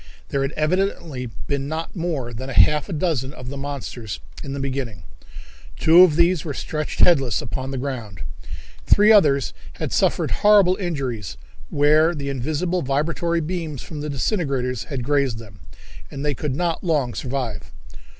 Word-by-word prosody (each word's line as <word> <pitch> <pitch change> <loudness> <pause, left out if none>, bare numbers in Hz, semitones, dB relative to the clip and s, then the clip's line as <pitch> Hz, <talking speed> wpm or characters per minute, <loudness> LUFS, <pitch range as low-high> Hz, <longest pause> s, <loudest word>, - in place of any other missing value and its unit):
There 140 - 0
had 135 +1 -1
evidently 155 -6 -1 0.2
been 140 -1 -2
not 160 +5 -4
more 155 -9 -3
than 130 +4 -6
half 135 - +4
a - - -3
dozen 145 -5 -1
of 125 0 -8
the 140 - -6
monsters 130 - -5 0.2
in 135 - -5
the 140 - -4
beginning. 130 -9 -4 0.7
Two 165 +3 +7
of 180 -5 +6
these 170 0 +3
were 145 -4 -4
stretched 155 -1 -3
headless 135 - +4
upon 130 +2 -4
the 135 - -3
ground. 120 - -5 0.7
Three 210 +1 +6
others 145 - +4 0.2
had - - -4
suffered - - +1
horrible 205 -3 +5
injuries 130 - -3 0.3
where 155 +3 +4
the 140 -2 -4
invisible 155 +7 -1
vibratory 165 +5 0
beams 160 -4 -4
from 150 -3 -7
the 150 - -4
disintegrators 135 - -1
had 135 -4 -4
grazed 140 -3 +1
them, 100 -4 -12 0.5
and 140 +1 -6
they 145 - +1
could 140 0 -3
not 170 +1 -1
long 145 -9 +1
survive. 125 -5 -4
140 Hz, 160 wpm, -22 LUFS, 130-165 Hz, 0.7 s, Two